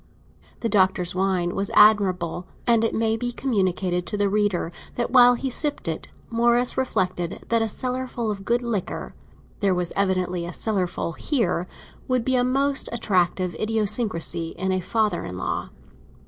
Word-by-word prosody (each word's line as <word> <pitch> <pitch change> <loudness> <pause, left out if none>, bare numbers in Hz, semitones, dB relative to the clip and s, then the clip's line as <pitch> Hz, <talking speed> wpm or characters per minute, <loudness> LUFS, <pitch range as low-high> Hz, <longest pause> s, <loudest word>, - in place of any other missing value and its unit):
The 230 - 0
Doctor's 190 -4 +2
wine 185 -2 0
was 195 0 -2
admirable, 185 -5 +4 0.2
and 230 -2 +3
it 225 - 0
may 225 0 +1
be 245 +2 -3
communicated 185 -8 -1
to 210 - -2
the 205 -1 +2
reader 205 -5 0 0.2
that 240 0 -2
while 245 -1 +7
he 265 +2 -3
sipped 290 - +1
it 160 - -3 0.2
Morris 235 +1 +3
reflected 185 -9 -1
that 230 -1 +3
a 225 - 0
cellar 255 +3 -3
full 235 -3 -3
of 195 -1 -6
good 240 +4 0
liquor—there 200 -2 -4
was 180 -1 -2
evidently 185 -3 0
a 175 - -6
cellar 195 -3 0
full 175 - -4
here—would 230 - -2
be 260 - +2
a 245 - +3
most 275 +2 +2
attractive 185 -5 0
idiosyncrasy 210 -6 -1
in 190 0 -1
a 185 - +1
father 215 +3 0
in 90 - -6
law. - - -3
210 Hz, 160 wpm, -24 LUFS, 180-235 Hz, 0.2 s, while